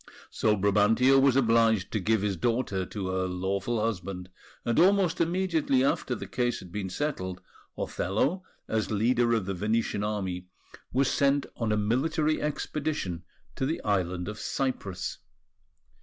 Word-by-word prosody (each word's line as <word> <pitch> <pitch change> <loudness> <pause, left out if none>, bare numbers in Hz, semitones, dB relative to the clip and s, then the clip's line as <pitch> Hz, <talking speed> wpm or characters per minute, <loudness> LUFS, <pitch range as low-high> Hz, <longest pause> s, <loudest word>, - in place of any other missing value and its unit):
So 105 -1 +2
Brabantio 105 +7 +4
was 135 -2 +4
obliged 115 -5 +3
to 110 - 0
give 110 +1 +1
his 100 -2 0
daughter 100 -2 -1
to 100 -3 -4
her 95 0 0
lawful 95 +5 -1
husband; 95 -4 -3 0.4
and 120 - +2
almost 190 -1 +4
immediately 165 -6 +1
after 135 -2 0
the - - -6
case 120 -1 -1
had 90 - -11
been 100 -1 -3
settled, 95 -7 -3 0.4
Othello, 135 - -1 0.2
as 110 -1 -1
leader 120 +3 +2
of 110 -5 -1
the 100 - -2
Venetian 105 +2 0
Army, 95 -4 -3 0.4
was 135 +1 +2
sent 140 +1 +2
on 115 -2 -1
a 105 - +2
military 150 +8 +1
expedition 150 - -2 0.3
to 130 - -1
the 160 - -1
island 90 -3 0
of 105 +1 -6
Cyprus. 115 -8 -3
110 Hz, 145 wpm, -28 LUFS, 95-135 Hz, 0.4 s, Brabantio